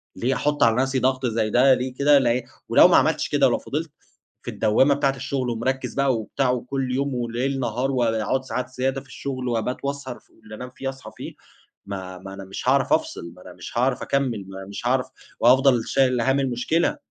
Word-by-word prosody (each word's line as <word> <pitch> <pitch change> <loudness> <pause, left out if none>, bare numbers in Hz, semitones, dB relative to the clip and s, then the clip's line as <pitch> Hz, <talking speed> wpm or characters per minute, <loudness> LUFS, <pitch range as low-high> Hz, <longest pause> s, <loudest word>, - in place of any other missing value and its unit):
ليه 130 +3 0
أحط 150 0 +1
على 115 -1 +4
نَفْسي 135 0 0
ضغط 130 +1 0
زي 110 -2 0
ده؟ 130 +4 +5
ليه 130 0 -2
كده 140 +2 +4
ل 125 -1 +1 0.3
ولو - - +7
ما - - +5
عملتش - - +1
كده، - - +4
ولو - - +1
فضِلت - - -4 0.5
في - - -5
الدوامة 110 +6 +3
بتاعة 140 -1 +1
الشغل 135 -1 -2
ومركِّز 130 +3 -2
بقى 140 -2 +2
وبتاع 125 +3 -1
كُلّ 135 -2 -2
يوم 140 0 -1
وليل 125 +3 -2
نهار 125 +2 -1
واقعد 120 0 0
ساعات 125 0 -4
زيادة 130 +1 -2
في 135 - -20
الشغل 130 -1 -5
وأبات 120 +2 -1
واسهر 140 -3 -4
ف - - -33
اللي 110 0 -10
أنام 125 +3 -8
فيه 135 - -3
أصحى 130 -5 -10
فيه، - - -7 0.5
ما 95 -2 -6
ما 95 +1 -10
أنا 95 0 -8
مش 95 - -3
هاعرَف - - +3
أفصِل، 85 - -2
ما 90 - -16
أنا 90 - -11
مش - - -9
هاعرَف 125 +1 +1
أكمّل، 125 -8 -1
ما 95 0 -8
مش 100 +4 -5
هاعرَف 125 +1 +1 0.3
وهافضَل 125 -1 +4
شايل 130 -3 +2
هَم 135 +3 +2
المشكلة. 135 - 0
125 Hz, 205 wpm, -23 LUFS, 115-135 Hz, 0.5 s, ولو